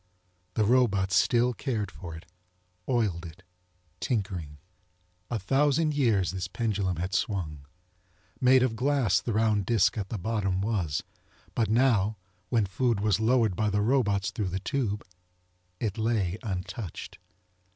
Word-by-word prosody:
The 110 - +3
robots 100 -5 +3
still 120 +6 +3
cared 110 -6 -3
for 85 -4 -8
it, 80 - -11 0.6
oiled 105 -9 +1
it, 85 +2 -11 0.6
tinkering. 90 - -2 0.7
A 120 - -1
thousand 145 - +2
years 115 -10 +2
this 95 -1 -3
pendulum 105 -6 -1
had 90 +3 -3
swung. 80 -8 -2 0.7
Made 130 0 +5
of 120 -3 0
glass 125 -6 +2
the 120 - -3
round 105 -3 +1
disk 115 -1 +3
at 95 -2 -4
the 110 - -3
bottom 100 -2 -1
was, 95 -8 -1 0.5
but 115 -4 +1
now 110 -3 +3 0.3
when 115 -4 +2
food 115 +3 0
was 105 -2 +2
lowered 110 -3 +3
by 110 +2 +1
the 105 0 +1
robots 105 -6 +2
through 100 -4 -2
the 95 +2 -2
tube 105 -2 -2 0.8
it 110 -1 -2
lay 110 -4 0
untouched. 95 - -5
105 Hz, 140 wpm, -28 LUFS, 95-120 Hz, 0.8 s, Made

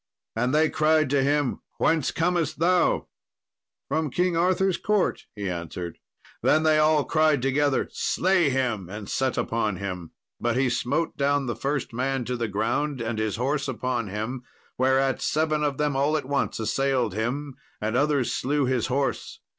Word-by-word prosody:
And 125 +3 +1
they 155 +2 +4
cried 155 -2 +2
to 140 -1 +3
him, 145 -1 +1 0.2
"Whence 160 -4 +2
comest 165 -2 0
thou?" 175 +2 +2 0.8
"From 160 -1 0
King 180 +5 +1
Arthur's 185 +2 +2
court," 210 -3 0
he 100 -2 -4
answered. 85 -1 -5 0.4
Then 155 - +3
they 155 -1 +4
all 155 -1 +3
cried 155 -4 +2
together, 135 +1 +1
"Slay 185 -4 +2
him," 120 -9 -1
and 105 0 -7
set 130 -2 -1
upon 110 -3 0
him. 90 -3 -5 0.3
But 120 0 0
he 130 -1 +2
smote 140 +7 -1
down 140 0 +1
the 120 - -2
first 140 -3 -2
man 130 +1 -1
to 125 - -2
the 120 -1 -2
ground, 120 +8 -1
and 115 -1 -3
his 110 -2 -1
horse 135 +5 -1
upon 125 -3 -2
him; 110 +6 -4 0.3
whereat 130 0 +2
seven 155 -1 +1
of 145 -2 0
them 150 -2 0
all 145 +3 +2
at 145 - -4
once 140 -3 -1
assailed 125 0 0
him, 130 +7 -2 0.3
and 110 +2 -2
others 145 -2 +1
slew 145 +1 0
his 125 -2 0
horse. 135 +1 -2
135 Hz, 165 wpm, -25 LUFS, 120-150 Hz, 0.8 s, they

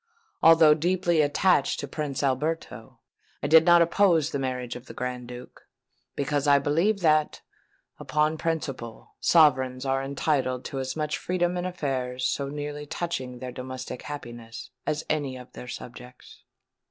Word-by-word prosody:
Although 165 -2 +7
deeply 175 +1 +1
attached 145 +1 +2
to 145 - -4
Prince 145 -1 -4
Alberto, 150 +5 -2 0.5
I - - +1
did 160 +2 +7
not 175 -1 +7
oppose 170 -3 +3
the 140 - -2
marriage 125 -2 -3
of 125 +1 -10
the - - -10
Grand 125 -1 -4
Duke; 125 0 -11 0.5
because 145 +1 -1
I 140 0 +6
believed 170 +8 +1
that, 155 -1 +2 0.6
upon 155 +1 0
principle, 135 -8 -4
sovereigns 130 -5 +3
are 135 0 +1
entitled 135 -2 -1
to 135 - -4
as 130 0 -3
much 150 -1 -2
freedom 180 -1 0
in 180 0 -2
affairs 130 -7 -3
so 140 +2 -1
nearly 145 0 -5
touching 130 -7 -4
their 125 +1 -6
domestic 130 0 -7
happiness, 120 -5 -8 0.2
as 150 0 -1
any 145 -4 -1
of 125 0 -12
their 125 - -9
subjects. 125 +1 -10
145 Hz, 150 wpm, -26 LUFS, 130-160 Hz, 0.6 s, Although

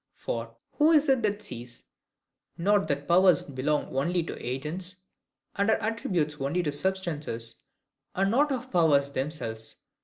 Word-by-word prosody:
For, 115 0 -5 0.2
who 310 +2 +6
is 305 -1 +5
it 265 -2 +4
that 210 -1 -1
sees 120 - -8 0.7
not 200 +3 +2
that 140 0 -2
powers 180 -2 +5
belong 140 0 -2
only 170 +6 +1
to - - -7
agents, 155 +9 -4 0.6
and 200 +2 +1
are 220 - +4
attributes 180 -10 -1
only 165 +6 0
of 145 - 0
substances, 150 -10 -3 0.5
and 195 +1 +2
not 285 +5 +3
of 255 -1 -3
powers 145 -6 +3
themselves? 130 -6 -4
165 Hz, 145 wpm, -28 LUFS, 140-200 Hz, 0.7 s, who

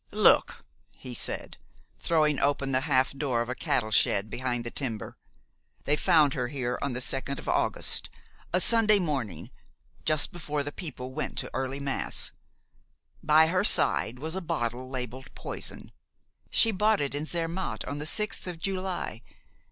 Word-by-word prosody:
"Look!" - - +4 0.3
he 125 - -10
said, - - -2 0.4
throwing 155 -4 +2
open 140 -1 0
the 130 0 +2
half 130 -1 +3
door 135 -4 -1
of 120 - -10
a - - -1
cattle 130 -6 -1
shed 100 0 +3
behind 120 -1 -2
the 120 - -5
timber. 115 -6 -4 0.7
"They 145 - +3
found 155 -4 +4
her 125 -2 -2
here 125 -2 -3
on 140 -2 -2
the 125 - -3
second 135 +2 -1
of - - -9
August, - - +1 0.4
a 180 - +2
Sunday 215 +1 +5
morning, 140 - -3 0.5
just 155 +2 +1
before 150 -5 -3
the 145 - -5
people 130 -6 -7
went - - -3
to 135 -2 -3
early 135 +2 -3
mass. 140 -1 -2 0.9
By 155 +1 +6
her 180 +4 +1
side 125 - +5
was 160 +5 -5
a 190 - -3
bottle 130 -7 -3
labeled 130 0 -6
'Poison.' - - -2 0.6
She 225 - +6
bought 210 +1 +2
it 140 -1 -2
in 145 +2 -3
Zermatt 170 +2 -3
on 140 +2 -5
the 150 - -3
sixth 210 +1 -1
of 175 -2 -5
July. 185 - -3
140 Hz, 160 wpm, -28 LUFS, 130-165 Hz, 0.9 s, By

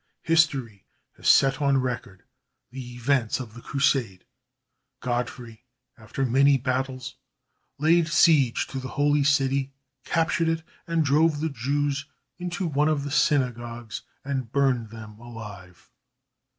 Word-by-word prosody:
History 140 - +1 0.3
has - - -1
set 135 +1 +5
on 140 -1 +3
record 120 -8 -4 0.5
the 125 -1 -8
events 120 -1 +1
of 120 -4 -8
the 120 - -11
Crusade. 130 -9 0 0.7
Godfrey, 120 -2 -4 0.3
after 120 +4 -4
many 135 +3 +4
battles, 130 0 -3 0.6
laid 160 +3 +3
siege 150 -6 +4
to 135 - -4
the 130 - -6
Holy 145 0 +3
City, 135 -1 +1 0.3
captured 165 0 +1
it, 165 0 -1 0.2
and 165 -2 +1
drove 150 +2 +3
the 160 +1 -1
Jews 140 +2 -1 0.3
into 180 +1 -3
one 150 -2 +1
of 150 -3 0
the 145 - -5
synagogues 120 -6 0 0.2
and 130 -4 -3
burned 130 -5 +1
them 110 -1 -11
alive. 105 -7 -11
135 Hz, 125 wpm, -25 LUFS, 120-145 Hz, 0.7 s, set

